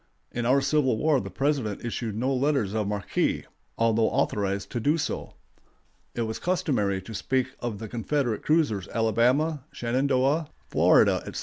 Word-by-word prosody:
In 120 -1 -2
our 135 +2 +4
Civil 135 -4 +2
War 150 0 +2
the - - -6
President 135 -8 -1
issued 115 -2 -3
no 130 +4 0
letters 135 -6 +1
of 110 -2 -1
marque, 100 -1 -1 0.3
although 115 -1 +3
authorized 100 -1 -1
to 120 - -2
do 145 +7 +2
so. 155 - -4 0.8
It 120 - 0
was 110 0 -4
customary 130 - 0
to 110 - -9
speak 130 +4 0
of 120 -4 -4
the 110 +2 -6
Confederate 120 +1 -1
cruisers 145 - +1
Alabama, 125 +7 +1
Shenandoah, 135 +5 +1 0.2
Florida, - - +5
etc. - - -5
120 Hz, 150 wpm, -26 LUFS, 110-140 Hz, 0.8 s, Florida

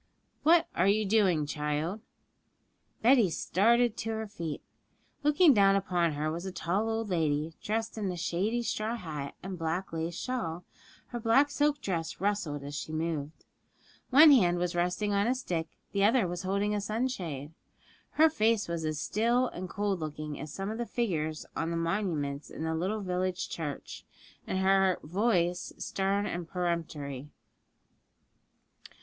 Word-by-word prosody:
'What 330 +2 +5
are 185 - +3
you 210 +2 +3
doing, 190 -7 +3
child?' 150 +7 -2 1.0
Betty 235 -4 +6
started 230 +8 +2
to 225 - -3
her 220 0 -2
feet. 170 -7 -6 0.6
Looking 300 +2 +5
down 195 -3 +5
upon 180 -4 +1
her 150 +2 -1
was 170 +2 -4
a 190 - -4
tall 190 +5 -1
old 225 -1 -2
lady, 155 -2 0
dressed 225 +1 -2
in 200 -3 -1
a 180 - -5
shady 195 +8 -1
straw 220 0 -1
hat 155 -9 -6
and 190 -1 -6
black 165 +3 -2
lace 165 +1 -3
shawl; 180 -10 -3 0.5
her 240 - -4
black 245 +6 +4
silk 290 0 +1
dress 170 -7 -3
rustled 185 -8 -1
as 145 +1 -7
she 145 +2 -5
moved. 155 -2 -3 0.6
One 300 +4 +9
hand 180 -10 +5
was 175 0 -1
resting 180 +4 0
on 200 +2 +2
a 250 - +2
stick, 175 -10 -2 0.2
the 200 -1 +1
other 225 -1 +4
was 175 0 -4
holding 200 +2 0
a 205 - 0
sunshade. 195 - -3 0.6
Her 315 +1 +6
face 225 -8 +1
was 170 -1 -3
as 155 -1 -2
still 235 +8 +1
and 185 +1 -7
cold 200 0 -1
looking 155 -1 -5
as 150 +1 -6
some 195 +5 -4
of 220 - -5
the 240 - -1
figures 160 -10 -2
on 165 - -1
the 170 - -1
monuments 165 -5 -2
in - - -6
the 160 0 -1
little 190 +7 -1
village 185 0 -2
church, 150 -4 -6 0.4
and - - -1
her 190 -1 +3
voice 180 0 0
stern 200 +1 -1
and 175 -4 -4
peremptory. 155 -6 -3
185 Hz, 160 wpm, -30 LUFS, 165-220 Hz, 1.0 s, One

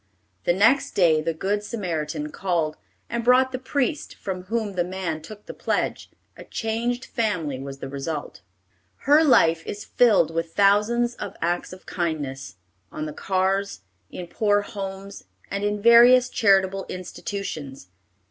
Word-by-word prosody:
The 175 - +3
next 225 +9 +3
day 165 -5 +4
the 165 +1 -1
good 195 +6 -1
Samaritan 160 -8 -4
called, 170 -5 -1 0.3
and 235 0 -3
brought 255 +2 +4
the 255 - -4
priest, 285 +3 -2
from 185 -2 -6
whom 220 0 -2
the 180 -2 0
man 175 -3 -4
took 205 +6 -12
the - - -8
pledge. - - -2 0.3
A - - -11
changed 235 +2 -2
family 175 - -2
was 135 0 -7
the 135 - -7
result. 140 -5 -5 0.6
Her 295 +3 +6
life 165 - +4
is 205 0 -6
filled 205 -9 +3
with 165 0 -3
thousands 210 +4 +3
of - - -7
acts 175 +1 -1
of 185 0 -12
kindness, 145 - -4 0.4
on 155 - -5
the 150 - -6
cars, 195 - -1 0.3
in 180 - -7
poor 205 +3 +1
homes, 195 -1 -7 0.3
and 200 +1 -2
in 205 0 0
various 240 +3 +7
charitable 195 -3 +2
institutions. 165 - -6
195 Hz, 150 wpm, -24 LUFS, 165-225 Hz, 0.6 s, various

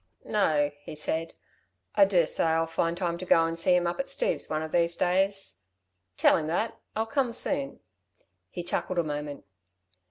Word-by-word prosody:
"No," 150 -8 +2
he 155 - -8
said, 160 +2 -1 0.6
"I 200 - +6
dursay 175 -5 +2
I'll 165 0 +2
find 165 +1 -1
time 170 -2 -2
to 185 - -6
go 165 -1 +5
and 165 0 0
see 180 +2 +4
him 175 -1 +2
up 170 +7 -2
at 275 - -2
Steve's - - -1
one 155 0 -1
of 160 - -6
these 170 -1 +2
days. 195 - 0 0.6
Tell - - +5
him 155 - -3
that... 175 +8 -2 0.2
I'll 220 +1 0
come 255 +1 0
soon." 275 +3 -2 0.7
He 175 - -6
chuckled 180 +1 -2
a 170 - +3
moment. 145 -1 -5
170 Hz, 180 wpm, -28 LUFS, 160-195 Hz, 0.7 s, I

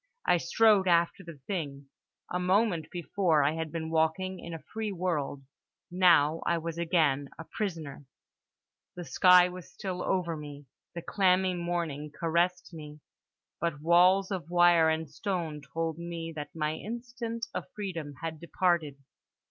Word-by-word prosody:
I 175 - +4
strode 200 +3 +3
after 170 +2 +2
the 170 -3 -10
thing. 145 -7 -4 0.5
A 180 - 0
moment 180 -2 +1
before 175 -3 +1
I 140 - +3
had 160 -1 -4
been 160 0 -4
walking 165 +4 0
in 170 - -8
a 165 -1 -7
free 220 -1 -2
world: 165 -7 -2 0.5
now 170 -4 +4
I 170 - +1
was 165 0 -5
again 155 -5 +1
a - - -7
prisoner. 160 -8 -5 0.9
The 175 - -6
sky 180 0 +6
was 180 -1 -10
still 185 -2 -5
over 175 -3 -1
me, 145 -1 -9 0.3
the 170 - -5
clammy 185 -1 +2
morning 170 -4 -3
caressed 170 +2 0
me; 150 -2 -10 0.6
but 165 -3 -2
walls 180 +4 +4
of 180 -4 -4
wire 175 -2 +5
and 160 0 -1
stone 165 -2 -4
told 165 0 -2
me 170 -1 -5
that 145 0 -7
my 155 -1 -1
instant 230 +3 -5
of - - -5
freedom 170 -8 -5
had 160 -1 -4
departed. 170 -3 0
170 Hz, 150 wpm, -29 LUFS, 160-185 Hz, 0.9 s, sky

